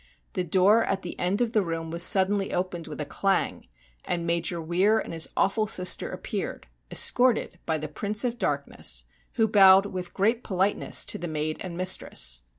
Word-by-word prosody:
The 185 - -1
door 190 +6 +3
at 195 -1 -2
the 175 - -7
end 185 +5 -1
of 235 -1 0
the 215 - +3
room 165 -2 -4
was 170 +1 -1
suddenly 195 +2 +4
opened 180 -2 -3
with 150 -1 -8
a 150 - -3
clang, 195 +6 -1 0.4
and 170 -1 -3
Major 170 0 -1
Weir 180 +7 +2
and 220 - -4
his 165 -1 -1
awful 215 +2 +1
sister 180 -3 0
appeared, - - -5 0.2
escorted 245 -8 +2
by 160 - 0
the 155 0 -5
Prince 205 - -2
of 245 -1 -2
Darkness, 140 - -3 0.3
who 225 -1 +2
bowed 195 -2 +6
with 180 -3 -6
great 225 +5 +1
politeness 195 0 0
to - - -3
the 175 - -5
maid 155 0 -3
and 175 -2 -7
mistress. 180 - +1
185 Hz, 180 wpm, -26 LUFS, 165-205 Hz, 0.4 s, bowed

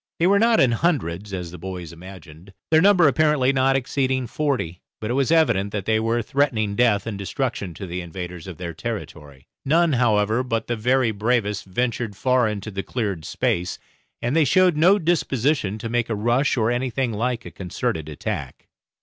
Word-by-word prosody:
They 165 - +3
were 200 +2 +4
not 230 +1 +4
in 130 -3 +4
hundreds, 105 - -1
as 90 -3 -5
the 90 - -10
boys 90 -2 -7
imagined, 90 0 -13 0.2
their 160 0 +6
number 185 -4 +6
apparently 145 -2 +3
not 135 0 +2
exceeding 130 0 0
forty; 125 - -2 0.2
but 110 +2 -3
it - - +1
was 135 +2 +1
evident 115 -12 +3
that 100 -3 -3
they 110 0 +2
were 115 +1 0
threatening 110 -6 0
death 105 -4 +2
and 105 -3 -5
destruction 100 - -3
to 100 - -7
the 90 0 -4
invaders 90 0 -7
of 90 -4 -8
their 85 -2 -5
territory. 75 - -7 0.2
None, 165 +2 +3
however, 110 -2 +2
but 115 -3 -2
the 120 - -2
very 125 +1 +2
bravest 105 -1 0
ventured 115 +2 -2
far 125 +2 +2
into 105 0 -4
the 95 0 -3
cleared 100 - -3
space, 90 +1 -1 0.5
and 120 +5 0
they 165 - +5
showed 180 +4 +4
no 175 +7 +5
disposition 145 - 0
to 110 - -5
make 120 0 -1
a 115 - 0
rush 120 +7 +1
or 115 0 +2
anything 125 0 -1
like 115 +2 -2
a - - -8
concerted 80 -4 -3
attack. 75 - -6
115 Hz, 185 wpm, -23 LUFS, 95-135 Hz, 0.5 s, their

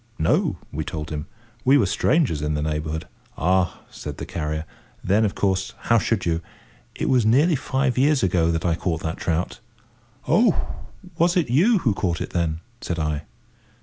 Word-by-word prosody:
"No," 80 - +2
we 80 +2 -3
told 75 0 -5
him. 75 +1 -4 0.4
We 135 +2 +6
were 120 - +3
strangers 110 - +2
in 75 0 -1
the 75 - -1
neighbourhood. 75 +1 -3 0.3
"Ah!" 90 0 +1
said - - -7
the - - -5
carrier, 75 -1 -3 0.4
"then, 100 +4 +3
of 100 - -2
course, 95 -1 0
how 115 -1 +3
should 115 - 0
you? 85 -1 0 0.5
It - - -2
was 125 -3 +4
nearly 140 +10 +4
five 130 -1 0
years 140 -1 +3
ago 85 -3 +2
that 80 +1 -1
I 85 - +3
caught 80 -1 -2
that 80 +1 -3
trout." 85 +1 -2 0.7
"Oh! - - +4 0.6
was 175 +2 +3
it 155 -10 +1
you 195 - +5
who 110 - +4
caught 90 -4 -1
it, - - -4
then?" 80 -2 -1 0.2
said 85 - -3
I. 75 -1 -2
90 Hz, 180 wpm, -23 LUFS, 80-120 Hz, 0.7 s, We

